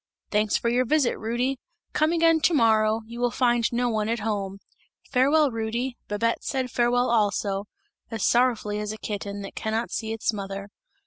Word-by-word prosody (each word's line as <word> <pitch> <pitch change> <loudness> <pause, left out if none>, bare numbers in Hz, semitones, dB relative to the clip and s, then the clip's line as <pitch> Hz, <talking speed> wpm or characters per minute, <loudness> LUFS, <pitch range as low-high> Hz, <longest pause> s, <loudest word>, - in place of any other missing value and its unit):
"'Thanks 210 0 +2
for - - -2
your 245 +2 +3
visit, 275 0 +2
Rudy! 245 +4 -1 0.3
Come 310 +1 +2
again 330 -1 +4
to 325 +2 +3
morrow, 220 -3 +3
you 235 +2 -9
will 245 0 +2
find 240 -2 +1
no 245 +1 +1
one 220 -2 0
at 230 - 0
home. 200 -3 -2 0.5
Farewell, 280 +3 +4
Rudy!' 235 +3 -2
Babette 230 +3 -1
said 260 -2 -2
farewell 245 +1 +2
also, 205 -3 +1 0.4
as 225 -3 -2
sorrowfully 235 -4 +2
as 210 0 -3
a 215 - -6
kitten, 205 -1 -5
that 195 - -8
cannot 220 +2 -2
see 220 -1 -3
its 225 0 -1
mother. 200 0 -6
230 Hz, 175 wpm, -25 LUFS, 210-250 Hz, 0.5 s, again